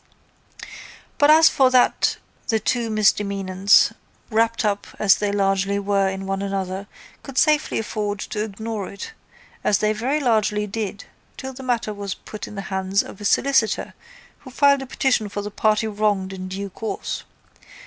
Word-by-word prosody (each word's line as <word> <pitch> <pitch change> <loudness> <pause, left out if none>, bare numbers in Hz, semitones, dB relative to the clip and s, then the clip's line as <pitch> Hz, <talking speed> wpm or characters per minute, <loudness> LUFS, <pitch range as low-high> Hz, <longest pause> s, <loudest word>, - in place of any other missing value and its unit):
But 290 - +5
as 315 +1 +8
for 265 -2 +4
that 255 -1 +3 0.3
the 225 -1 +1
two 230 +2 -1
misdemeanants, 200 -2 +3 0.4
wrapped 225 +1 +1
up 205 -1 -1
as 200 -3 +5
they 205 -1 -1
largely 195 0 +1
were 200 -1 +1
in 190 0 -5
one 195 0 -2
another, 195 0 -3 0.3
could 275 -2 -10
safely 305 -1 +3
afford 210 -2 -2
to 210 - -3
ignore 215 -1 -5
it 200 - -8 0.5
as 205 - +3
they 215 +1 +1
very 255 +8 -1
largely 215 -5 +1
did 205 -1 -5 0.3
till 265 0 -6
the 265 - -10
matter 240 -4 -1
was 200 -2 -5
put 215 - -9
in - - -10
the 195 - -4
hands 190 +1 +1
of 200 - -11
a - - -6
solicitor 265 0 +2 0.5
who 260 - -12
filed 280 +1 +3
a 270 - -7
petition 245 -5 0
for 205 0 -4
the 210 - -6
party 215 +1 +1
wronged 205 -3 0
in 185 -1 -6
due 195 +1 -5
course. 220 +3 -4
210 Hz, 165 wpm, -22 LUFS, 200-230 Hz, 0.5 s, as